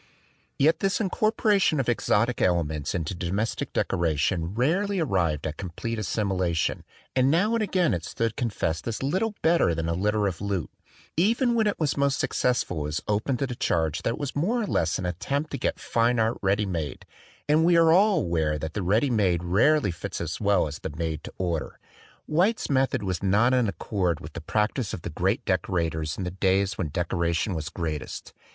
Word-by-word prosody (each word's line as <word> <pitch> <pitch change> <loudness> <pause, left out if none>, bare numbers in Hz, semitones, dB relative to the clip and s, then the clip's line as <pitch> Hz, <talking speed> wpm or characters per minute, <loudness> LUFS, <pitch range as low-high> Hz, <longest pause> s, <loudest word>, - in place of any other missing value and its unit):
Yet 155 +4 +3
this 195 0 +1
incorporation 210 - +2
of 130 - -1
exotic 120 0 +1
elements 80 -4 0
into 85 0 -2
domestic 95 +5 -2
decoration 85 +2 0
rarely 185 - +1
arrived 90 - 0
at 80 0 -4
complete 105 +5 -4
assimilation; 95 -6 -1 0.3
and 130 0 +4
now 190 +9 +2
and 230 - +1
again 185 -5 +1
it 85 -2 -2
stood 115 +4 -2
con 120 - -1
fessed 85 -4 -2
as 115 +2 -3
little 195 +10 0
better 160 - +3
than 80 0 -2
a 85 - 0
litter 105 +4 +1
of 95 -3 -2
loot. 100 -5 -2 0.5
Even 235 - +3
when 225 -2 +2
it 205 - -1
was 155 -3 0
most 140 -1 +2
successful 120 -9 0
it - - -2
was 75 +2 -2
open 105 +5 0
to 135 - -1
the 130 - -4
charge 80 -9 0
that - - 0
it - - -14
was 140 -2 -4
more 220 +11 +1
or - - -1
less 80 - 0
an 90 - -4
attempt 140 - -2
to 140 - -4
get - - -1
fine 120 +1 +1
art 115 +1 +1
ready 100 +2 +1
made; 80 -8 -4 0.4
and 155 +2 +4
we 170 0 +5
are 165 -1 +6
all 200 +3 +4
aware 80 -3 0
that 80 +1 -5
the 105 - -2
ready 110 +9 +2
made 95 -7 +2
rarely 100 - +3
fits 85 - -6
as 80 +3 -4
well 100 -3 +3
as 75 +1 -7
the - - -5
made 80 -2 -3
to - - -8
order. 85 -4 -2 0.5
White's 180 +5 +1
method 130 -5 +1
was 95 -3 -2
not 105 +6 +3
in 125 -3 +3
accord 95 -4 -1
with 75 +1 -10
the 85 - -6
practise 105 - -1
of 85 - -10
the 85 - -4
great 95 - 0
decorators 80 -4 -1
in 95 - -3
the 90 - -3
days 95 +1 +1
when 85 -5 -3
decoration 85 +3 -1
was 80 -1 -4
greatest. 80 -5 -5
100 Hz, 200 wpm, -26 LUFS, 85-140 Hz, 0.5 s, are